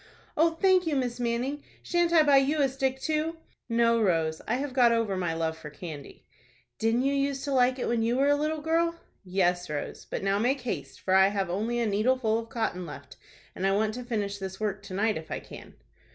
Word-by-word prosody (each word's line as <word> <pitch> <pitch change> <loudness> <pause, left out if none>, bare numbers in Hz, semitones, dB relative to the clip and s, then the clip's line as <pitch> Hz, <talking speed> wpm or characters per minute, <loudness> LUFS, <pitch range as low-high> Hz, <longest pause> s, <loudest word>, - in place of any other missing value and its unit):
"Oh, 325 +1 +3
thank 370 -2 +4
you, 305 - +1
Miss 250 -2 -1
Manning. 245 +4 -1 0.2
Shan't 345 -1 +1
I 325 -2 +6
buy 285 -2 +5
you 280 +3 +2
a - - +4
stick 265 0 -1
too?" 315 +3 -1 0.3
"No, 230 0 +3
Rose, 165 -5 +1
I - - +1
have 270 +1 -3
got 245 -2 +5
over 230 -4 +1
my 175 -3 -1
love 160 -1 -1
for 160 -1 -9
candy." 150 -1 -9 0.5
"Didn't 225 +3 +2
you 275 +1 +1
use 275 -1 -1
to 285 - -3
like 255 0 +3
it 250 - -2
when 235 -1 +1
you 235 +2 +1
were 275 +1 +3
a 290 - +5
little 305 +1 -1
girl?" 335 +2 +1 0.3
"Yes, 180 -2 0
Rose; 150 -1 -5
but - - -5
now 195 +1 +1
make 260 +5 +1
haste, 140 - -5
for 185 - 0
I 190 0 +7
have 195 -3 -1
only 220 +6 -1
a 235 - +1
needleful 220 +2 +1
of 230 0 -8
cotton 220 -6 -2
left, - - -10 0.4
and 190 - 0
I 195 - +2
want 215 +2 +1
to 250 +2 -6
finish 205 -4 -3
this 190 0 -6
work 210 -2 -2
to 190 -2 -7
night, 215 0 +1
if 160 - -13
I - - -3
can." - - -12
230 Hz, 225 wpm, -28 LUFS, 195-275 Hz, 0.5 s, I